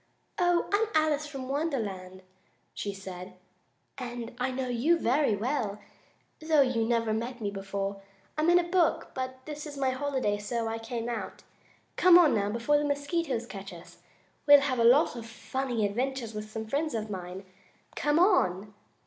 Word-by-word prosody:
"Oh! 350 -1 +2
I'm 435 +2 +3
Alice 305 -1 0
from 270 -3 -7
Wonderland," 210 - -3 0.5
she 205 - -4
said, 185 -1 -9 0.6
"and 240 -2 -6
I 250 +1 0
know 260 0 -3
you 250 +8 +2
very 270 -5 +2
well, 215 -2 -2 0.6
though 315 -3 +4
you 245 -4 0
never 230 -2 +1
met 240 +3 -3
me 205 -3 -2
before. 195 0 -4 0.3
I'm 310 +2 +2
in 350 - +6
a 355 - +3
book, 345 -1 +1
but 260 0 -5
this 300 0 -6
is 290 -1 -8
my 265 -1 +1
holiday, 260 -6 -1
so 225 +2 -2
I 225 0 -3
came 230 0 -4
out. 225 -5 -5 0.5
Come 360 -1 +8
on, 335 -5 +6
now, 205 -2 +1
before 235 +7 +2
the - - -1
mosquitoes 285 -3 -1
catch 195 -3 -8
us! 175 0 -13 0.5
We'll 285 -1 +9
have 260 -3 -1
a - - +4
lot 250 +4 +5
of 230 -1 -7
funny 245 -1 -2
adventures 240 +2 -2
with 215 0 -6
some 220 0 -5
friends 285 +4 -1
of 215 -1 -3
mine. 185 0 -6 0.5
Come 295 +1 +1
on!" 210 - +3
245 Hz, 170 wpm, -29 LUFS, 210-290 Hz, 0.6 s, We'll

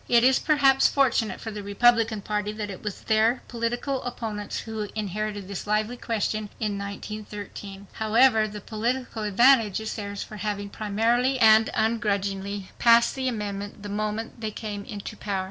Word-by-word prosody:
It 235 -1 +5
is 260 +1 +5
perhaps 275 -3 +4
fortunate 235 -7 +1
for 220 - -6
the 210 -1 -6
Republican 225 +1 +3
Party 210 0 -2
that 210 -1 -4
it 185 - -9
was 210 -2 -5
their 220 +3 +2
political 240 +3 -2
opponents 220 -4 -4
who 220 -2 -5
inherited 210 -1 -3
this 200 0 -6
lively 215 +3 0
question 215 -3 -2
in 210 -2 -1
1913. 200 -1 -7
However, 220 0 +4
the 210 0 -8
political 235 +2 -2
advantage 220 +1 +4
is 220 0 -4
theirs 200 -1 -5
for 215 - -10
having 205 -1 -3
promptly 230 +5 +1
and 220 -1 +6
ungrudgingly 200 -3 -1
passed 235 0 +5
the 260 -1 -2
amendment 205 -3 -4
the 205 - -6
moment 215 +3 -3
they 220 - -2
came 205 -1 -6
into 205 +1 -7
power. 200 -2 -3
215 Hz, 160 wpm, -26 LUFS, 205-230 Hz, -, and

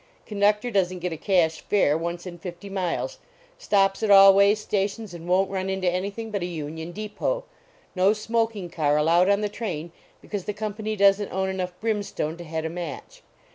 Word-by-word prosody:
Conductor 210 +3 +1
doesn 185 -3 +1
t - - -8
get 175 -1 -3
a - - -4
cash 165 -2 +1
fare 190 -8 +2
once 170 +2 -4
in 175 -2 -8
fifty 180 +3 -8
miles. 195 - -2 0.4
Stops 195 -1 +2
at 220 - 0
all 195 -1 +9
way 200 +1 +5
stations 210 -1 -3
and 170 0 -9
won 185 +2 +3
t - - -12
run 190 0 -2
into 190 -1 -1
anything 200 +5 -2
but 200 -2 -2
a - - -1
union 160 0 -6
depot. 215 - -3 0.5
No 190 +2 +4
smoking 225 -2 -1
car 150 -3 +1
allowed 170 +5 +4
on 200 +1 +3
the 210 - 0
train 175 -7 -5 0.3
because 205 -4 -6
the 210 - -2
company 215 +1 -4
doesn 200 0 +4
t - - -15
own 190 0 -1
enough 180 -1 -4
brimstone 205 -8 -2
to 175 - -8
head 160 -1 -4
a - - 0
match. 170 -4 -7
195 Hz, 200 wpm, -25 LUFS, 175-210 Hz, 0.5 s, all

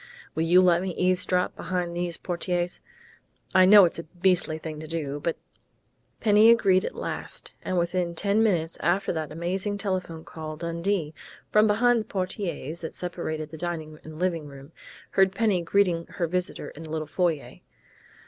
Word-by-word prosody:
Will 160 - -2
you 180 +2 +6
let 175 -1 +4
me 185 -2 -3
eavesdrop 180 0 +1
behind 175 -1 -3
these 175 -1 -2
portieres?... 175 0 -2 0.7
I 185 0 +7
know 200 0 +9
it's 170 - -2
a - - -5
beastly 175 -1 +1
thing 155 -1 -7
to 155 - -8
do, 150 -3 -3
but 165 0 -1 0.4
" - - -44
Penny 215 +1 +6
agreed 195 -5 +5
at - - -4
last, - - -6
and 185 - -2
within 175 0 0
ten 200 +5 +2
minutes 170 -7 +1
after 185 +3 +1
that 155 -2 -4
amazing 185 +5 -2
telephone 185 -5 -3
call 155 -1 -7
Dundee, 170 0 -2 0.4
from 215 +1 +5
behind 235 +3 +3
the - - -8
portieres 185 -4 -4
that 160 - -5
separated 160 -3 -4
the 160 - -8
dining 160 -2 -4
and 155 0 -10
living 170 -3 -1
room, 140 +1 -12 0.4
heard 190 0 +3
Penny 210 -4 +2
greeting 170 -1 +1
her 175 - -2
visitor 180 +2 -2
in 155 - -12
the 160 - -9
little 155 0 -3
foyer. 155 - -2
175 Hz, 170 wpm, -26 LUFS, 160-190 Hz, 0.7 s, know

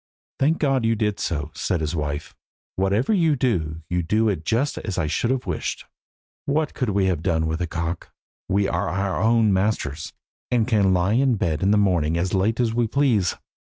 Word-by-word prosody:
"Thank 155 +4 +3
God 135 -4 +1
you 115 0 +2
did 105 -2 -1
so," 75 -2 -2
said 90 - -1
his 80 +1 -2
wife; 75 -1 -3 0.4
"whatever 100 - +1
you 165 -6 +3
do 80 - -1
you 90 +2 0
do 110 +6 +1
it 90 -6 -2
just 125 - 0
as 100 -4 -5
I - - +1
should 75 +10 -1
have 130 -1 -1
wished. - - -3 0.6
What 150 +1 0
could 125 - -2
we 100 -1 +1
have 90 -4 0
done 80 -2 0
with 80 +2 -2
a 85 - -1
cock? 85 0 -4 0.4
We 100 +1 +2
are 90 -1 -1
our 95 +2 -1
own 110 -2 +3
masters, 95 -6 -1 0.4
and 120 -2 +1
can 105 -6 +3
lie 90 +2 +2
in 130 0 +3
bed 85 -8 -1
in 95 - +2
the 105 - +4
morning 85 -6 +2
as 90 +2 -1
late 100 +5 +1
as 115 -2 +1
we 120 0 +1
please. 115 -8 +2
100 Hz, 200 wpm, -23 LUFS, 85-115 Hz, 0.6 s, the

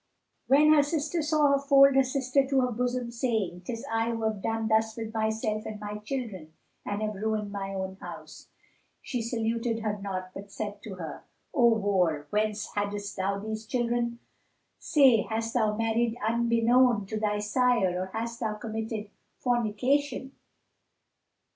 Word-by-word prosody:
When 300 +3 +6
her 300 - +6
sister 310 +3 -1
saw 300 -1 +3
her 280 - +3
fold 275 0 +6
her 270 - +7
children 265 0 +1
to 270 -1 +3
her 250 -1 0
bosom, 245 +1 -2
saying, 220 -7 -1
"'Tis 230 +1 -5
I 225 +1 +1
who 230 -1 -3
have 215 -2 -1
done 225 +1 -1
thus 220 0 +2
with 225 -1 -5
myself 220 -1 -1
and 215 -1 -6
my 210 0 -5
children 210 - -5 0.3
and 205 +1 -3
have 215 0 -1
ruined 210 0 -2
my 195 -1 -4
own 190 0 -4
house!" - - -10 0.6
she 250 -3 -3
saluted 230 0 -1
her 210 -2 -2
not, 185 -2 -4
but 200 +1 -9
said 205 0 -5
to 200 -3 -6
her, 170 -3 -7 0.3
"O 235 -5 +5
whore, 180 -8 +1
whence 210 0 -1
haddest 205 0 -3
thou 195 +1 -1
these 220 +2 -5
children? 235 -1 0 0.6
Say, 265 -7 +5
hast 225 +1 -3
thou 215 -3 +2
married 225 +1 0
unbeknown 235 0 +3
to 215 +2 -4
thy 210 -1 0
sire 210 -4 +2
or 185 - -3
hast 230 +4 -4
thou 220 -2 -2
committed 220 -1 -5 0.3
fornication? 250 +4 0
225 Hz, 160 wpm, -28 LUFS, 210-245 Hz, 0.6 s, her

